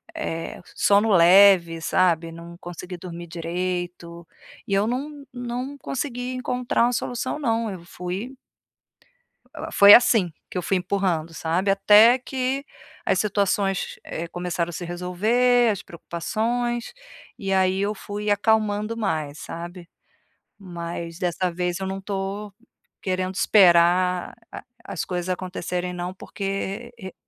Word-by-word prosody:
eh, 165 Hz, -, -4 dB
sono 205 Hz, +2 st, +3 dB
leve, 175 Hz, -1 st, +6 dB
sabe? 165 Hz, -2 st, +1 dB
Não 170 Hz, +1 st, -10 dB
consegui 175 Hz, +1 st, -8 dB
dormir 175 Hz, -1 st, -8 dB
direito, 170 Hz, 0 st, -4 dB, 0.4 s
e 200 Hz, -, -2 dB
eu 195 Hz, +1 st, +3 dB
não 280 Hz, +4 st, -4 dB
não 250 Hz, +3 st, -5 dB
consegui 255 Hz, -2 st, -4 dB
encontrar 250 Hz, -1 st, 0 dB
uma 245 Hz, +1 st, +2 dB
solução, 245 Hz, +4 st, -3 dB
não. 230 Hz, -5 st, 0 dB
Eu 180 Hz, -3 st, -8 dB
fui 190 Hz, +10 st, -6 dB, 1.2 s
Ela -, -, -6 dB
foi 200 Hz, +1 st, +9 dB
assim, 220 Hz, -8 st, +5 dB, 0.2 s
que -, -, -6 dB
eu 180 Hz, -, 0 dB
fui 190 Hz, +2 st, +1 dB
empurrando, 180 Hz, -3 st, -1 dB
sabe? 175 Hz, +5 st, 0 dB
Até 210 Hz, +5 st, +6 dB
que 265 Hz, +2 st, -2 dB, 0.4 s
as -, -, +2 dB
situações, 200 Hz, -2 st, 0 dB
eh, 170 Hz, +1 st, -5 dB
começaram 175 Hz, 0 st, -3 dB
a -, -, -5 dB
se 175 Hz, -, -5 dB
resolver, 220 Hz, +8 st, +2 dB
as 200 Hz, -, -4 dB
preocupações. 235 Hz, -, -3 dB, 0.4 s
E 195 Hz, -4 st, -4 dB
aí, 190 Hz, 0 st, +2 dB
eu 210 Hz, +1 st, -1 dB
fui 205 Hz, +1 st, -5 dB
acalmando 215 Hz, +1 st, +1 dB
mais, 155 Hz, -9 st, -2 dB
sabe? 170 Hz, +1 st, -8 dB, 0.7 s
Mas 170 Hz, -3 st, -7 dB
dessa 180 Hz, -1 st, -1 dB
vez, 180 Hz, +1 st, -2 dB
eu 190 Hz, -, -3 dB
não 195 Hz, 0 st, -4 dB
tô 195 Hz, +1 st, -4 dB, 0.5 s
querendo 185 Hz, 0 st, -2 dB
esperar 180 Hz, -2 st, +4 dB, 0.2 s
a -, -, -8 dB, 0.2 s
as 190 Hz, -5 st, -4 dB
coisas 180 Hz, 0 st, -3 dB
acontecerem 180 Hz, -1 st, -3 dB
não 180 Hz, +1 st, -4 dB
porque 195 Hz, +4 st, -5 dB
e 190 Hz, -2 st, -8 dB
190 Hz, 130 wpm, -24 LUFS, 175-220 Hz, 1.2 s, foi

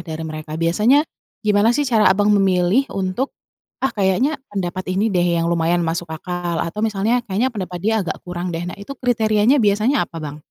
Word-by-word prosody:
dari 160 Hz, 0 st, -5 dB
mereka, 155 Hz, 0 st, -6 dB
biasanya 215 Hz, -, +3 dB, 0.4 s
gimana 210 Hz, +1 st, +4 dB
sih 290 Hz, -, +1 dB
cara 220 Hz, -5 st, +4 dB
Abang 205 Hz, +1 st, +1 dB
memilih 190 Hz, +5 st, +3 dB
untuk, 195 Hz, +8 st, -2 dB, 0.5 s
"Ah, 265 Hz, -, +1 dB
kayaknya 210 Hz, +10 st, +1 dB, 0.2 s
pendapat 185 Hz, -1 st, -3 dB
ini 205 Hz, +4 st, +1 dB
deh 175 Hz, -1 st, +2 dB, 0.2 s
yang 165 Hz, -, 0 dB
lumayan 170 Hz, +1 st, +1 dB
masuk 165 Hz, +1 st, -2 dB
akal," 175 Hz, 0 st, -3 dB
atau 170 Hz, +6 st, -4 dB
misalnya, 220 Hz, +3 st, +1 dB
"Kayaknya 210 Hz, +7 st, 0 dB
pendapat 180 Hz, -3 st, -4 dB
dia 220 Hz, +3 st, +1 dB
agak -, -, -4 dB
kurang 175 Hz, 0 st, -4 dB
deh." 165 Hz, -, -3 dB
Nah, 180 Hz, -, -6 dB
itu 200 Hz, +7 st, -8 dB
kriterianya 225 Hz, +1 st, +2 dB
biasanya 215 Hz, +7 st, +2 dB
apa, 165 Hz, -, -9 dB
Bang? 150 Hz, -1 st, -6 dB
195 Hz, 185 wpm, -20 LUFS, 175-220 Hz, 0.5 s, gimana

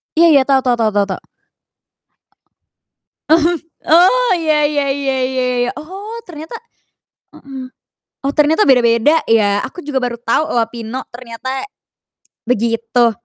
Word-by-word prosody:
Iya 315 Hz, -5 st, +5 dB
tau 270 Hz, -1 st, +3 dB
tau 250 Hz, -2 st, +2 dB
tau 220 Hz, -1 st, +2 dB, 0.2 s
tau. 190 Hz, -, -4 dB, 2.1 s
Mhm. 330 Hz, +1 st, +3 dB, 0.3 s
Oh, 380 Hz, +9 st, +5 dB
ya 310 Hz, -2 st, +1 dB
ya 290 Hz, -2 st, -1 dB
ya 270 Hz, -1 st, -1 dB
ya 260 Hz, -1 st, -1 dB
ya 245 Hz, 0 st, 0 dB
ya. -, -, -2 dB
Oh 395 Hz, +8 st, -8 dB
ternyata 320 Hz, +3 st, -9 dB, 0.8 s
heeh, 265 Hz, -2 st, -9 dB, 0.6 s
oh 275 Hz, +1 st, -1 dB
ternyata 310 Hz, +6 st, +3 dB
beda-beda 245 Hz, +3 st, +4 dB
ya, 205 Hz, -3 st, +3 dB
aku 355 Hz, +6 st, -10 dB
juga 285 Hz, -2 st, -2 dB
baru 245 Hz, -2 st, -2 dB
tau 240 Hz, +6 st, 0 dB
loh 230 Hz, -2 st, +2 dB
Pino, 235 Hz, +2 st, -6 dB
ternyata 250 Hz, -, -6 dB, 0.8 s
begitu. 230 Hz, 0 st, +1 dB
265 Hz, 125 wpm, -16 LUFS, 240-310 Hz, 2.1 s, Iya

